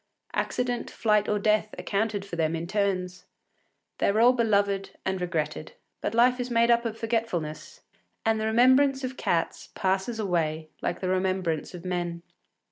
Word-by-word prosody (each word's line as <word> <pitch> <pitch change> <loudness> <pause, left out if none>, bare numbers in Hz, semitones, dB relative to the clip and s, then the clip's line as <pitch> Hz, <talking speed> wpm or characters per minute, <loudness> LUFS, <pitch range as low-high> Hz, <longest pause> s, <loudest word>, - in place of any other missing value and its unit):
Accident, 245 -1 -1
flight, 210 -2 +1
or 210 - +2
death 215 +1 +1
accounted 205 -1 -1
for 195 - -6
them 160 -1 0
in 165 +1 -3
turns. 185 -2 -1 0.7
They - - +3
were 215 - +1
all 245 +2 +7
beloved 200 -4 +1 0.2
and 190 -1 -1
regretted; 155 -3 -3 0.3
but 225 - -2
life 250 +2 +4
is 245 0 -2
made 235 0 +3
up 235 0 +3
of 225 -1 -3
forgetfulness, 225 -9 -3 0.4
and 220 -1 +2
the 220 - 0
remembrance 260 +4 +4
of 255 0 -3
cats 165 -8 -1
passes 190 +4 0
away 160 -5 -1
like - - -2
the 185 - -1
remembrance 185 -3 -1
of 175 0 -10
men. 175 -2 -3
200 Hz, 160 wpm, -27 LUFS, 180-230 Hz, 0.7 s, all